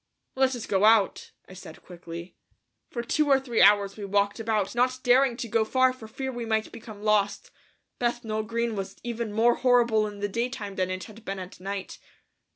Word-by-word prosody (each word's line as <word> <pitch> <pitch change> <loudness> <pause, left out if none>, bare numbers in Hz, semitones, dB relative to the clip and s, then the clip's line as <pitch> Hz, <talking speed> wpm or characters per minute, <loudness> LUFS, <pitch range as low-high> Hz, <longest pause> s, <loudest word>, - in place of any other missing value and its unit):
"Let 265 -1 +2
us 235 - -6
go 195 0 +1
out," 215 -2 +4 0.2
I - - -12
said 175 -4 -12
quickly. 170 0 -9 0.5
For 235 - -4
two 300 +5 +1
or 275 -1 +5
three 245 -4 0
hours 200 -1 +5
we 210 - -7
walked 200 +2 0
about, 215 -3 -1
not 250 +1 +1
daring 250 0 +4
to 240 - -4
go 225 0 +2
far 255 +3 +2
for 235 -4 -11
fear 265 +4 -5
we 240 -1 -5
might 220 -1 -1
become 220 -2 -11
lost. 210 -1 +1 0.5
Bethnal 235 -3 -1
Green 230 +1 -2
was 195 -1 -5
even 235 -2 -4
more 230 +3 +4
horrible 235 -4 +3
in 205 -1 -9
the 205 - -1
daytime 230 -1 -3
than 185 -1 -1
it 185 0 -4
had 220 0 -13
been 195 -1 -4
at 185 -1 -9
night. 195 +1 -6
220 Hz, 195 wpm, -26 LUFS, 200-240 Hz, 0.5 s, or